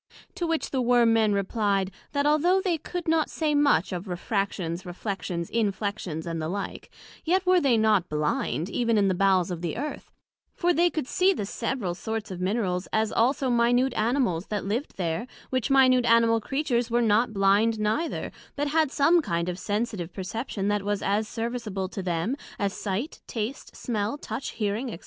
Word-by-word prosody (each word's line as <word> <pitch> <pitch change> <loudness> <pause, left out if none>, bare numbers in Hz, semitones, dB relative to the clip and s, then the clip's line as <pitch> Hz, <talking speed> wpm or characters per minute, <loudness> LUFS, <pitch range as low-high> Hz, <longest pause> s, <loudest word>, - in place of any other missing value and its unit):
To 345 - -2
which 325 -1 -1
the 265 - 0
Worm 240 -2 +4
men 220 -2 +3
replied, 200 -1 0 0.2
that 285 0 +1
although 315 +6 +4
they 360 -4 0
could 350 +3 -5
not 320 -1 +2
say 310 -2 0
much 285 - +3
of 180 +3 -5
refractions, 185 -2 -2
reflections, 175 -2 -4
inflections, 200 -6 -2
and 165 -1 -3
the 155 - -2
like; 200 +2 -5 0.3
yet 370 +3 +1
were 365 -1 +4
they 260 -5 +3
not 215 -5 +3
blind, 150 0 -1
even 230 +1 +1
in 200 -1 +3
the - - +2
bowels 185 -1 +2
of 170 -2 -4
the 170 +1 -3
Earth: 295 +4 -5 0.4
for 350 0 +2
they 345 +2 +4
could 315 -5 -3
see 375 +6 +3
the 205 - -3
several 215 -3 -2
sorts 220 +2 -4
of 180 -1 -6
Minerals, 185 -2 -1
as 220 0 +1
also 255 +2 +2
minute 245 +2 +3
Animals, 220 -7 0
that 205 -2 -3
lived 230 +9 -3
there; 180 +6 -2 0.2
which 255 -1 0
minute 255 -2 +5
Animal 230 0 +4
Creatures 250 -3 -1
were 240 +1 +2
not 225 +2 +3
blind 205 +3 +3
neither, 220 +11 -1 0.2
but 290 0 -1
had 310 -2 +2
some 330 +5 +4
kind 170 - -1
of 180 +1 -4
sensitive 205 -4 -2
perception 200 +2 -4
that 205 0 +1
was 205 0 -2
as 210 +2 +1
serviceable 225 -5 -3
to 195 - -5
them, 175 +6 -1 0.2
as 200 -4 -1
sight, 210 - -4
taste, 230 +3 -5
smell, 220 +2 -2
touch, 280 - -5
hearing, 215 +4 -2
&c. 225 - -5
220 Hz, 180 wpm, -26 LUFS, 195-260 Hz, 0.4 s, minute